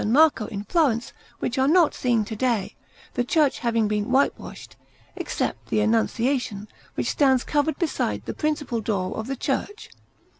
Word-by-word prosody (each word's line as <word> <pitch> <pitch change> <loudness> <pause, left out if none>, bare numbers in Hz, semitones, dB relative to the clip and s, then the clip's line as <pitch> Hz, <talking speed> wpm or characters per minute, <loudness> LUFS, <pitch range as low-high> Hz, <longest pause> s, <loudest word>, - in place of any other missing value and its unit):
Marco 270 0 +4
in 200 -1 -5
Florence, 245 -5 +1 0.2
which 255 - -2
are 265 - +3
not 330 +1 +4
seen 235 -4 +1
to 220 - -6
day, 230 -4 -1 0.4
the 245 - 0
church 290 +2 +2
having 230 -3 +1
been 210 +1 -1
whitewashed, 265 +2 -1 0.4
except - - -3
the - - +1
Annunciation, 225 0 0 0.3
which - - -1
stands 265 -3 +3
covered 295 +1 0
beside 110 - -1
the - - -4
principal 290 -6 -2
door 195 -4 -2
of 220 - -4
the 270 - -2
church. 410 - -3
245 Hz, 155 wpm, -24 LUFS, 215-285 Hz, 0.4 s, Marco